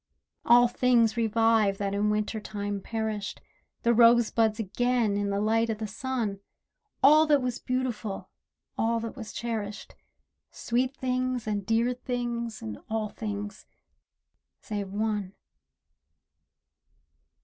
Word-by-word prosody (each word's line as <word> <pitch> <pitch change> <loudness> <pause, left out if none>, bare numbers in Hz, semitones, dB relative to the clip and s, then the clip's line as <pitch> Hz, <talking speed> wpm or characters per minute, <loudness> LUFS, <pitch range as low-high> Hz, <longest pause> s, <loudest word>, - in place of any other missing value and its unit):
All 245 +1 +7
things 235 -2 +3
revive 225 -3 +2
that 200 -1 -2
in 205 +1 +1
Winter 210 +1 -1
time 205 -1 -4
perished, 220 -1 -3 0.4
The 235 - +4
rose 235 0 +6
buds 220 -2 +2
again 230 +1 0
in 205 0 -1
the 200 0 0
light 225 +2 +2
o' 220 - 0
the 215 +1 -5
sun, 220 -2 -3 0.6
All 305 +3 +7
that 295 -2 +5
was 250 -1 -2
beautiful, 250 -6 -3 0.5
all 230 +1 +1
that 230 -1 -5
was 225 -4 -8
cherished, 215 -3 -5 0.6
Sweet 255 +3 -1
things 255 -1 -1
and 205 -2 -2
dear 230 +2 +2
things 240 -2 -4
and 110 -1 -6
all 220 -1 -1
things—save 205 -1 -8
one. 205 -2 -2
225 Hz, 120 wpm, -28 LUFS, 210-240 Hz, 0.6 s, All